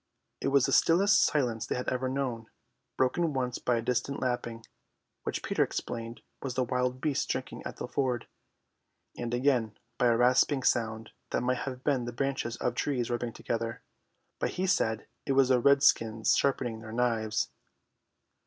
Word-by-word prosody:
It - - -2
was 140 -2 +4
the - - -1
stillest 195 +4 +5
silence 120 -6 0
they - - -1
had 125 - -4
ever 130 0 -1
known, 130 -4 -2 0.5
broken 155 +5 +1
once 125 -2 -2
by 125 - +1
a 115 - -2
distant 125 +3 -1
lapping, 120 -2 -3 0.6
which - - -4
Peter - - 0
explained 115 0 -5 0.2
was 130 -2 -4
the 130 - +2
wild 125 +1 -1
beasts 150 -3 0
drinking - - -3
at - - -9
the - - -5
ford, 125 -4 -1 0.9
and 120 -1 -4
again 120 -4 +1 0.2
by 125 - +4
a 115 -1 +4
rasping 130 +3 +3
sound 110 -1 0 0.2
that - - 0
might 125 +1 +1
have 130 0 -9
been 135 -5 +1
the 120 - -5
branches 135 -2 -2
of 125 - -1
trees 125 -5 -1
rubbing 120 0 -2
together, 115 0 -4 0.6
but - - 0
he 185 - -1
said 110 - +1 0.2
it 135 - +2
was 135 -1 +4
the 130 -1 +5
redskins 120 -5 +4
sharpening 125 -5 0
their 110 0 -9
knives. 115 -2 0
125 Hz, 170 wpm, -29 LUFS, 115-135 Hz, 0.9 s, stillest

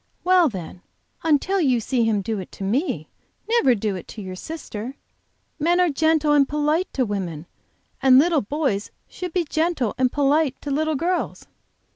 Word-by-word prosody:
"Well 360 -3 +5
then, 180 -4 -8 0.4
until 330 +5 +2
you 255 -6 +3
see 235 +1 0
him 210 -3 +1
do 215 +1 -2
it 185 - -8
to - - -7
me, 250 - -1 0.4
never 445 - +4
do 205 -2 -2
it 180 - -8
to 215 - -8
your 185 -1 -6
sister. 255 - -7 0.6
Men 340 +4 +2
are 355 -3 +3
gentle 310 0 +2
and 280 -2 +4
polite 300 +4 0
to 260 - +1
women, 180 -7 -4 0.6
and 265 -1 +6
little 315 +1 +4
boys 225 -4 -1 0.2
should 360 -2 -6
be 360 +1 +1
gentle 315 -8 0
and 255 -1 +3
polite 290 0 +1
to 285 - -4
little 310 +2 0
girls." 350 +5 -2
280 Hz, 170 wpm, -23 LUFS, 220-320 Hz, 0.6 s, and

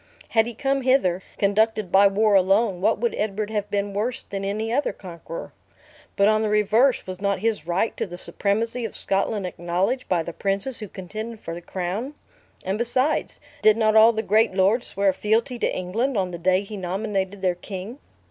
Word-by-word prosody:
Had 225 0 +3
he 240 - -6
come 270 +3 0
hither, 250 -9 +2 0.2
conducted 210 -1 +1
by 200 +1 +7
war 210 +2 +2
alone, 195 0 +3
what - - +2
would 235 +2 -1
Edward 210 0 -2
have 205 -2 -2
been 200 0 -1
worse 235 +5 -2
than 195 0 -6
any 215 +3 -2
other 285 +3 +1
conqueror? 170 -3 -9 0.6
But 200 - +4
on 215 0 +3
the 215 - 0
reverse, 215 +5 +3
was 185 0 -7
not 200 -1 +1
his 220 -7 -1
right 180 +6 0
to - - -2
the 175 -1 -8
supremacy 225 +6 -2
of 225 - -5
Scotland 195 +1 +1
acknowledged 180 +8 -2
by 175 -3 +1
the 170 - -7
princes 200 +8 -1
who 210 - -6
contended 215 +5 -7
for 165 - -6
the 170 - -7
crown? 190 - -4 0.5
And 195 +3 -1
besides, 255 +6 0 0.2
did 215 0 +5
not 215 -1 +2
all 220 +1 +8
the 220 -1 -3
great 215 -1 +2
lords 200 +6 +2
swear 195 -1 +1
fealty 230 +6 0
to - - +1
England, 220 +8 -1
on 185 -2 0
the 170 - -6
day 185 +2 +2
he 205 +1 -8
nominated 195 +1 -3
their 180 -1 +3
king?" 195 +7 -8
205 Hz, 195 wpm, -24 LUFS, 190-225 Hz, 0.6 s, all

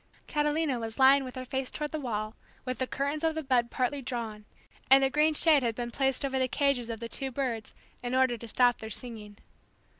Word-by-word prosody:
Catalina 295 -3 0
was 225 -1 -6
lying 270 +1 +6
with 255 0 -8
her 255 0 -5
face 265 0 -3
toward 300 -1 -5
the 310 - -3
wall 215 -5 -3 0.3
with 255 0 -3
the 260 - -1
curtains 285 +3 -2
of 320 -1 +1
the 315 - -3
bed 250 -3 +2
partly 270 +3 -1
drawn, 230 -4 -5 0.4
and 270 +1 +7
a 270 - +2
green 305 +2 +3
shade 305 -2 +5
had 230 -3 -1
been 240 0 -4
placed 270 +2 0
over 265 -1 -1
the 260 - +2
cages 275 -3 0
of 225 -1 -4
the 230 - -5
two 270 +3 -2
birds 245 -4 -3 0.3
in 245 +1 -2
order 260 -2 +3
to 235 0 -9
stop 245 +2 +3
their 220 - -7
singing. 215 -3 -7
260 Hz, 220 wpm, -29 LUFS, 235-280 Hz, 0.4 s, and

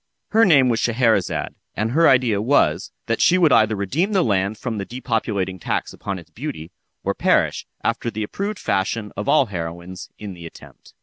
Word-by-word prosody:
Her 225 +1 +5
name 140 -8 +5
was 115 -2 +1
Scheherazade, 115 -5 +1 0.2
and 110 +2 -1
her 165 +5 +5
idea 125 -6 +3
was, 100 - +2
that 115 - -1
she 185 - +5
would 165 -5 +4
either 110 -2 +4
redeem 145 - -1
the 190 -3 +3
land 100 0 0
from 115 -2 -4
the - - -2
depopulating 105 -5 -2
tax - - -2
upon 100 -2 -5
its 85 - -13
beauty, 125 - -6 0.3
or - - 0
perish, - - +1 0.2
after 120 - -1
the 110 -1 -4
approved 200 - -4
fashion 105 +1 -1
of 105 +1 -3
all 150 -3 +5
heroines, 85 -2 -7
in 105 -2 -7
the 85 -2 -9
attempt. - - -16
110 Hz, 185 wpm, -21 LUFS, 95-130 Hz, 0.3 s, Her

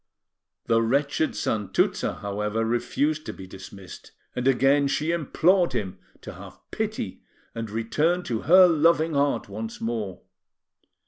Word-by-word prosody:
The 115 0 +3
wretched 140 +6 0
Santuzza, 105 -3 -1
however, 105 +2 -2
refused 140 +7 0
to - - -4
be 95 - -10
dismissed; 95 0 -12 0.2
and 125 +1 -1
again 135 +2 +3
she 155 +3 0
implored 170 +1 +2
him 95 -6 -4 0.2
to - - -8
have - - -12
pity - - -4 0.3
and 115 -1 -5
return 150 - 0
to 115 -8 -2
her 185 +4 +7
loving 165 0 +3
heart 140 0 +1
once 110 +3 -6
more. 110 -5 -4
120 Hz, 130 wpm, -25 LUFS, 110-155 Hz, 0.3 s, her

